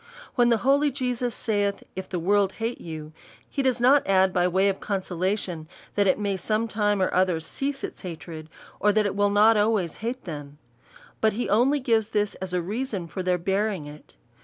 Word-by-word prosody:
When 240 -2 +4
the 230 - +4
holy 285 +2 +4
Jesus 250 -2 -2
saith. 205 -2 -1
If 190 0 -6
the 180 - -2
world 195 +2 +2
hate 230 +3 -4
you, 155 -2 -7 0.3
(he 280 - -2
does 260 -2 +1
not 265 +4 +4
add 190 -1 +4
by 180 0 +3
way 190 +2 +2
of 195 -1 0
consolation, 185 -3 -2 0.3
that 205 -1 +2
it 185 - +3
may 200 -2 -1
some 215 +4 0
time 205 -2 +1
or - - 0
other 185 -2 +2
cease 275 - -4
its - - -6
hatred, 165 -3 -8 0.3
or 210 - +4
that 215 0 +2
it 195 - -1
will 205 0 +3
not 210 +2 +5
always 205 -6 +1
hate 240 +4 -4
them; 145 -4 -8 0.6
but 220 -1 +3
he 245 +4 -2
only 255 +8 +3
gives 225 -4 +1
this 210 -2 0
as 190 -1 -4
a 180 -1 0
reason 210 -1 -3
for 170 +3 -5
their 180 0 +1
bearing 195 -1 -1
it). 150 +1 -13
205 Hz, 200 wpm, -25 LUFS, 180-225 Hz, 0.6 s, not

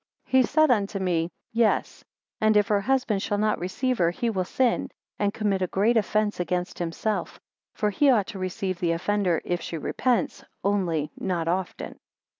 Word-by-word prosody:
He 260 0 +4
said 310 +2 +3
unto 205 -3 +1
me, 175 -3 0 0.2
Yes; 230 -1 +1 0.4
and 215 -1 +4
if 210 +2 +3
her 205 -1 +3
husband 245 -3 +1
shall 205 - -1
not 215 +1 +1
receive 250 +8 -1
her, 170 -1 +4
he 230 +7 -1
will 185 -3 -1
sin, 250 +4 +1 0.3
and 205 -1 +1
commit 205 -3 -1
a 185 - +1
great 210 +7 +2
offence 215 -1 +1
against 180 +1 -2
himself; 175 +5 -2 0.4
for 210 -1 0
he 280 +8 +3
ought 220 -7 +4
to 195 - -7
receive 185 0 -3
the 170 -2 +1
offender, 180 0 0
if 175 -1 -1
she 165 - -5
repents: 240 - 0 0.2
only 175 -7 0
not 170 -3 -1
often. 180 +2 -3
200 Hz, 175 wpm, -26 LUFS, 180-220 Hz, 0.4 s, He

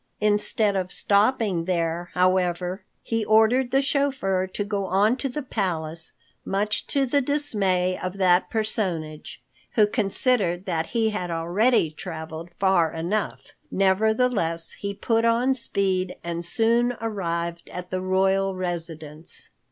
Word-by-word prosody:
Instead 210 0 +2
of 185 -1 -2
stopping 205 -4 +2
there, 170 -1 -1
however, 180 0 +1 0.2
he 225 -1 -1
ordered 220 +4 +4
the 270 +2 +2
chauffeur 265 -10 0
to 195 +2 -3
go 200 -1 -2
on 205 +6 +3
to 270 +1 -3
the 295 +3 -4
palace, 165 -8 -2 0.3
much 205 +2 -1
to 275 -1 +1
the 280 +3 +2
dismay 200 -11 +1
of 185 +1 -4
that 180 -1 +3
personage, 175 - -3 0.3
who 215 - +5
considered 205 -3 +1
that 165 -3 -1
he 225 -2 +1
had 180 -4 -3
already 170 +3 +2
traveled 160 0 -7
far 190 -5 +3
enough. 175 +6 -3 0.2
Nevertheless 195 -3 +1
he 200 0 -4
put 225 +3 +1
on 235 +3 +3
speed 190 -6 -1
and 170 0 -3
soon 235 +6 +2
arrived 170 -6 -3
at 180 0 -7
the 185 - -1
royal 190 +1 +1
residence. 165 -3 -4
195 Hz, 130 wpm, -24 LUFS, 175-220 Hz, 0.3 s, who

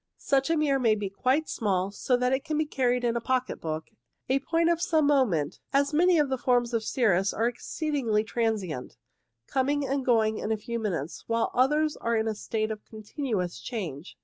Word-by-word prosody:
Such 275 +2 +1
a 330 - +2
mirror 285 -3 +2
may 225 -4 +3
be 205 -2 -4
quite 265 +9 +1
small, 195 -3 -1
so 250 +4 0
that 250 +1 +1
it 265 +1 0
can 310 -2 -2
be 310 - +1
carried 250 -4 0
in 235 -1 +1
a 235 - -1
pocket 255 +1 -1
book, 160 0 -4 0.4
a 265 +1 +3
point 330 +4 +1
of 340 0 0
some 315 -4 +2
moment, 210 - +2
as 280 +2 +2
many 350 +3 +4
of 300 -2 +3
the 265 -1 -2
forms 245 -1 +1
of 230 -1 0
cirrus 200 -6 +1
are 225 - +1
exceedingly 245 -3 -1
transient, 215 - -2 0.5
coming 280 - 0
and 275 0 -1
going 220 -3 +2
in 215 - -3
a 220 - +1
few 235 +2 -4
minutes, 170 -9 -3
while 230 0 0
others 300 +4 +2
are 230 0 -1
in 220 0 +1
a 220 - 0
state 215 +1 -2
of 215 -1 -6
con 215 -1 -10
tinuous 210 - -3
change. 175 - -6
240 Hz, 205 wpm, -27 LUFS, 215-275 Hz, 0.5 s, many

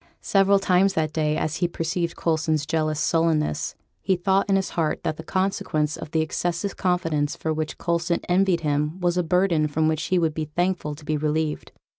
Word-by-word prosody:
Several 195 0 +4
times 195 0 +3
that 155 -1 0
day, 155 -1 0
as 155 +1 -1
he 175 - +1
perceived 170 0 -2
Coulson's 155 -2 0
jealous 155 -1 0
sullenness, 160 - +1 0.3
he 190 - +2
thought 190 +3 +1
in 195 - +4
his 190 -1 0
heart 160 -3 -1
that 155 -2 -2
the 160 - -7
consequence 185 -6 -1
of - - -8
the 160 0 +1
excessive 175 +4 -2
confidence 165 -5 0
for 160 - -2
which 155 0 -3
Coulson 170 0 0
envied 180 -1 +2
him 150 +3 -1
was 175 -1 +1
a 180 - +2
burden 175 -2 +2
from 155 +1 +1
which 160 0 0
he 185 - +1
would 165 -3 +1
be 155 0 -3
thankful 165 -1 -1
to 150 0 -14
be 155 0 0
relieved. 155 0 -1
165 Hz, 195 wpm, -24 LUFS, 155-180 Hz, 0.3 s, Several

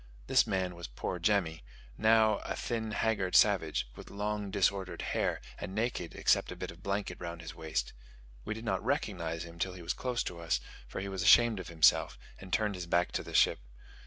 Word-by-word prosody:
This - - +4
man 95 -2 -1
was 85 -2 -7
poor 65 +9 -4
Jemmy, 85 - +1 0.3
now 110 - +4
a - - -4
thin, 115 -2 -3
haggard 105 -4 0
savage, 90 - +4
with - - -11
long 105 0 -3
disordered 95 -1 0
hair, - - 0 0.2
and 95 +3 -6
naked, 110 -6 -2
except - - +2
a - - -5
bit - - -5
of 85 +2 -15
blanket 100 0 -2
round 85 -1 -6
his 80 0 -7
waist. 80 -7 -3 0.5
We 110 - -3
did 110 +1 -8
not - - -1
recognize 80 0 -1
him 85 0 -11
till 95 +1 -1
he 90 -1 -10
was 85 - -1
close 125 -1 -2
to 85 - -6
us, 85 0 0 0.3
for - - -5
he 100 - -4
was 95 -2 -3
ashamed 120 -1 +6
of 95 - -7
himself, 80 -2 +4 0.2
and 95 -2 -11
turned 105 +1 +1
his 90 -2 -6
back 85 +1 +2
to - - -1
the - - -8
ship. - - +5
95 Hz, 205 wpm, -32 LUFS, 85-105 Hz, 0.5 s, ashamed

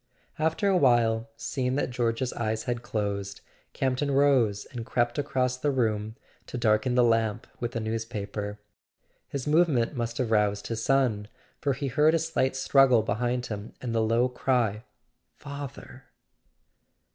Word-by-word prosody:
After 160 +5 +1
a 195 -2 +4
while, 115 -5 +3
seeing 125 +2 -2
that 145 - -1
George's 120 +1 -1
eyes 110 -1 -2
had 120 -1 -2
closed, 100 -3 -3 0.3
Campton 135 +2 0
rose, 135 -7 +3
and 120 -3 -5
crept 120 +2 0
across 130 -3 0
the 145 +3 0
room 110 -5 0 0.3
to - - -5
darken 115 +2 +2
the 125 - +5
lamp 115 -2 +1
with 120 +1 -4
a - - 0
newspaper. 105 -2 -4 0.7
His 140 -2 -4
movement 150 -5 +2
must 120 -1 -3
have 120 -3 -1
roused 105 -1 +2
his 115 0 -3
son, 125 -7 +1 0.3
for 140 - 0
he 140 +2 -4
heard 150 +4 +3
a - - +4
slight 160 -5 0
struggle 130 -3 +4
behind 120 +4 -1
him 105 -1 -6
and 120 -2 -4
the 115 - +2
low 115 +3 +2
cry: 125 -4 0 0.5
"Father!" 140 -2 -9
120 Hz, 150 wpm, -27 LUFS, 110-135 Hz, 0.7 s, the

